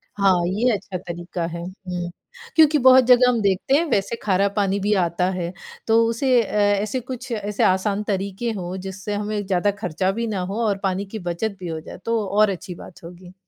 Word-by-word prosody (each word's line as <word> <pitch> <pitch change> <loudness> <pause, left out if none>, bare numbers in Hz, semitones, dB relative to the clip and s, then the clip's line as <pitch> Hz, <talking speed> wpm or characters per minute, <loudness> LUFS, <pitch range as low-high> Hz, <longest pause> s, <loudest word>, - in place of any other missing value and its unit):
हाँ, 195 -2 +4
ये 220 +7 +1
अच्छा 195 -1 -5
तरीका 175 -1 -5
है। 170 0 -6
हुँ, 180 -1 -6 0.5
क्योंकि 310 -1 +6
बहुत 260 -1 +7
जगह 250 0 +6
हम 240 -2 +1
देखते 200 +6 +1
हैं 330 +4 +3
वैसे 200 +3 0
खारा 200 -1 +2
पानी 200 -1 +1
भी 205 +2 +1
आता 175 +2 0
है, 175 -2 -3 0.4
तो 225 +1 +5
उसे 245 +1 +2
अ, - - -8
ऐसे 205 +3 +1
कुछ, 250 +1 -7
ऐसे 210 -2 -1
आसान 200 +2 +2
तरीके 200 +3 -2
हों, 180 0 -5
जिससे 195 +2 -6
हमें 210 0 -3
ज़्यादा 190 +1 +1
खर्चा 185 +1 0
भी 230 +3 -3
ना 205 -3 -2
हो 225 - -2
और 200 -1 +1
पानी 195 +1 -1
की 215 +3 -7
बचत 180 +4 -3
भी 180 - -6
हो 160 -1 -4
जाए? - - -10
तो 230 -2 0
और 210 +1 +3
अच्छी 180 -1 -5
बात 170 - -13
होगी। 175 +1 -12
200 Hz, 205 wpm, -22 LUFS, 185-225 Hz, 0.5 s, बहुत